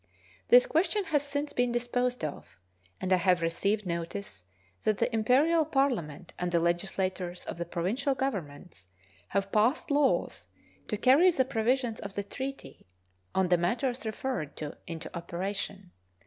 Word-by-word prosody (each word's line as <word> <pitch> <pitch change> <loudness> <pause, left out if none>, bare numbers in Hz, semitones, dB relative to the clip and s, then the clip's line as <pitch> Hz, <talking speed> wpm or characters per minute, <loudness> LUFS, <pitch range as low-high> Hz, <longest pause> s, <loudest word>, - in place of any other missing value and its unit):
This - - +8
question 370 +1 +1
has 315 -5 +1
since 285 +1 -3
been 245 -1 +1
disposed 245 -1 -1
of, 145 - -8 0.4
and 185 0 +1
I - - +5
have 180 -1 +2
received 200 +5 0
notice 170 - -5 0.4
that 215 -2 +1
the 245 - 0
Imperial 275 +9 +4
Parliament 240 - -1
and 180 0 -1
the 170 - +3
legislatures 180 +1 -1
of - - -6
the 170 - -3
provincial 230 +12 -1
governments 175 - -4 0.4
have 195 0 -1
passed 235 +9 +2
laws 285 -1 +1 0.4
to 210 - -2
carry 270 - +6
the 270 -7 +2
provisions 240 -1 0
of 200 -1 -7
the 200 - -1
treaty 270 - -7 0.5
on 190 -2 +2
the 175 -1 +4
matters 240 +8 0
referred 220 - -3
to 150 -1 -5
into 165 -1 -7
operation. 190 +2 -4
210 Hz, 150 wpm, -29 LUFS, 175-265 Hz, 0.5 s, This